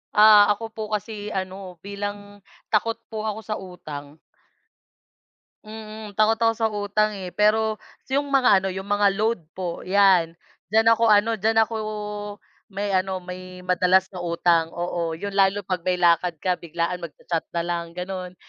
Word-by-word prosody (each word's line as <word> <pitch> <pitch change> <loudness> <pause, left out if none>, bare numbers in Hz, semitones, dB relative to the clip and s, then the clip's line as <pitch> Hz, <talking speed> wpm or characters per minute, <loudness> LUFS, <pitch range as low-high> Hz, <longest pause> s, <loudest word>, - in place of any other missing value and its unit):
Ah, 210 -1 +8
ako 225 +1 -8
po 220 -1 -6
kasi 210 0 -6
ano, 185 -1 -5
bilang 205 0 -6 0.3
takot 225 +1 +2 0.2
po 220 0 -3
ako 215 +1 -3
sa 215 - -3
utang. 155 -5 -9 1.5
Mm, 215 -1 -9
takot 215 +2 +3
ako 225 0 +3
sa 225 0 0
utang, 210 0 0
eh, 185 -2 -7
pero 215 +1 +2 0.3
'yong 285 +1 +1
mga 255 -8 +4
ano, 195 - -2
'yong 190 +1 -5
mga 205 0 +3
load 220 -1 +1 0.2
po, 175 -2 -4
'yan, 185 -4 +3 0.3
diyan 225 +2 +4
ako 230 - 0
ano, 210 +2 +4
diyan 220 +1 0
ako 225 - -7 0.9
may 200 0 -3
ano, 190 0 0
may 185 0 -9
madalas 185 +1 +2
na 185 - -7
utang 170 -1 +2
oo. 170 -1 -2
Yun 200 +3 -5
lalo 195 +1 +2
'pag 185 -2 -2
may 180 +1 0
lakad 175 0 +3
ka, 180 +2 -1
biglaan, 170 +1 -3
magcha-chat 165 0 -4
na 170 - 0
lang 170 -1 -4
gano'n, 185 0 -5
195 Hz, 160 wpm, -24 LUFS, 180-215 Hz, 1.5 s, Ah